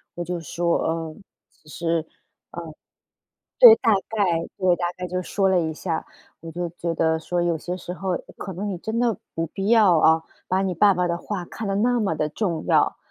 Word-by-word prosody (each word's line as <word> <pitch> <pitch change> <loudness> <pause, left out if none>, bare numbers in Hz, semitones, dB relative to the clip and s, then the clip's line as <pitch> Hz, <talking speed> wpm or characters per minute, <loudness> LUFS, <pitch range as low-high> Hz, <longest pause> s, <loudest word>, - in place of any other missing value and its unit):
我 175 - -4
就 175 +1 -3
说 170 +2 0
呃， 160 -1 -3 0.5
其 155 - -18
实 165 +1 -1
嗯， 155 - -16 1.5
对， 480 -3 +11
大 225 -4 +3 0.2
概 215 -2 0 0.3
对， 185 -2 +3
大 175 - -2
概 180 0 -4
就 180 +1 -2
说 195 +2 0
了 185 - +3
一 160 -1 -2
下， 165 0 -3 0.4
我 165 - -8
就 175 +1 -3
觉 170 -1 -2
得 160 0 +2
说： 175 +2 -2
“有 170 -2 0
些 175 +3 -5
时 180 0 -7
候 185 -1 -2 0.2
可 195 - -6
能 200 +4 -4
你 190 - -3
真 220 +6 -3
的 235 -4 +1 0.2
不 165 - -1
必 195 +5 -4
要 210 -7 +5
啊， 160 +1 +4 0.3
把 190 +1 +2
你 190 -2 -1
爸 200 +3 +5
爸 180 0 0
的 170 0 -1
话 185 0 -5
看 220 - -7
得 195 - -1
那 240 +4 +2
么 195 -6 0
的 155 0 -1
重 170 -3 -2
要。” - - +3
180 Hz, 225 characters per minute, -23 LUFS, 165-195 Hz, 1.5 s, 对